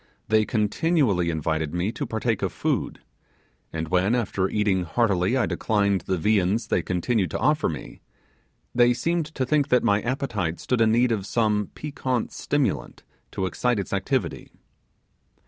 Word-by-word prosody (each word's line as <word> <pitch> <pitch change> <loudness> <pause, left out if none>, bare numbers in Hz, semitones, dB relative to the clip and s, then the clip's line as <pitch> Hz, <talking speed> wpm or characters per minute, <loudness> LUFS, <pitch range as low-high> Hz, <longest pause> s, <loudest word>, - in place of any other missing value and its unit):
They 110 0 +4
continually 110 - +1
invited 80 0 -1
me 90 +5 0
to 120 - -4
partake 110 -1 -1
of - - -1
food, - - -2 0.7
and 80 -1 -4
when 95 +5 +2
after 100 -5 0
eating 105 -3 +1
heartily 95 +4 +1
I 130 - +2
declined 100 -3 +1
the 95 - +1
viands 100 +4 +1
they - - +2
continued 90 +3 0
to - - -3
offer - - +2
me, - - -8 0.7
they 120 0 +4
seemed 170 +3 0
to 140 -4 -3
think 145 +1 +2
that 125 -3 +3
my 105 -2 +3
appetite 105 -10 -2
stood 125 -2 0
in 110 -1 +4
need 120 +2 +3
of 105 -3 -1
some 105 -3 +1
piquant 130 -5 -2
stimulant 140 -9 -2 0.3
to 95 - -1
excite 115 +8 0
its 100 - -4
activity. - - -2
110 Hz, 155 wpm, -25 LUFS, 95-125 Hz, 0.7 s, They